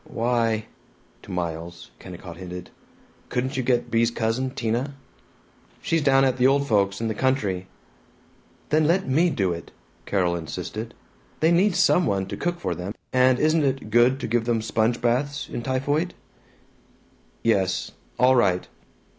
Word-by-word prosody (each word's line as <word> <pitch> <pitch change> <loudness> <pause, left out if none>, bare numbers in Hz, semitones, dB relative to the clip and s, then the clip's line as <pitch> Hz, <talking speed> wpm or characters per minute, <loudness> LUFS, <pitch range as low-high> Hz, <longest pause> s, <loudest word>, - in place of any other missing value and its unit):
"Why 115 -2 0 0.3
" - - -34
To - - -15
Miles, 85 -1 -5
Kennicott 90 -2 -10
hinted, 90 -1 -8 0.6
"Couldn't 130 +2 -2
you 130 - 0
get 120 -1 0
Bea's 115 0 +3
cousin, 115 +3 -1
Tina?" 125 +3 -2 0.8
"She's 165 -1 0
down 135 -2 +4
at 130 -1 +1
the 125 0 +5
old 140 +1 +2
folks', 100 -3 +2
in 115 - 0
the 110 - -1
country." 105 -7 0 1.0
"Then 155 0 +3
let 185 +4 +2
me 160 +7 +3
do 95 - 0
it!" 85 -1 -8 0.4
Carol 90 -3 +1
insisted. 110 +7 -6 0.4
"They 160 +2 +3
need 180 +2 +3
some 175 -3 +4
one 95 -1 0
to - - -4
cook 175 0 -2
for - - -2
them, 95 +4 -6 0.2
and 130 0 +4
isn't 155 0 +3
it 135 -5 -1
good 120 +4 +4
to - - -2
give 115 0 0
them 115 -2 0
sponge 115 +1 +1
baths, 140 +4 0
in - - -5
typhoid?" 145 +7 -1 1.3
"Yes. 95 -5 +1 0.3
All 130 +1 +5
right." 95 -7 +2
120 Hz, 155 wpm, -24 LUFS, 100-135 Hz, 1.3 s, the